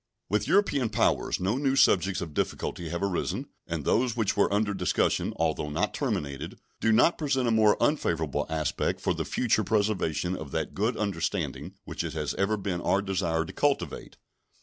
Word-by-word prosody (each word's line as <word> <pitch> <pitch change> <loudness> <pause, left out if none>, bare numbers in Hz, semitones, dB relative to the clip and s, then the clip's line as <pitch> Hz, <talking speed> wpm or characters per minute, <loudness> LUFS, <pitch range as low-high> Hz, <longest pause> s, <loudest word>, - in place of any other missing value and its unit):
With 105 +3 0
European 160 - +2
powers - - +1
no 100 +7 0
new 135 -1 +1
subjects 95 -7 +3
of 80 -3 -6
difficulty 85 +3 -2
have 85 +3 -3
arisen, 95 -3 -2 0.2
and - - -3
those 120 0 +2
which 110 -4 +1
were 100 - +2
under 105 0 +1
discussion, - - +1
although 80 -2 -1
not 75 - -1
terminated, 70 -2 -3 0.2
do 115 - +2
not 120 +10 +4
present 135 -5 +1
a - - +2
more 110 -2 +4
unfavorable 80 - 0
aspect 80 -2 -1
for - - 0
the - - -3
future 115 -3 +1
preservation 100 -4 0
of 80 -5 -7
that 80 -2 -2
good 110 +4 0
understanding 85 -3 -2
which - - -4
it - - -4
has - - -2
ever 100 +2 0
been 95 -3 -3
our 100 +1 +1
desire 85 -4 0
to - - -9
cultivate. 145 -1 -1
100 Hz, 175 wpm, -28 LUFS, 85-110 Hz, 0.2 s, not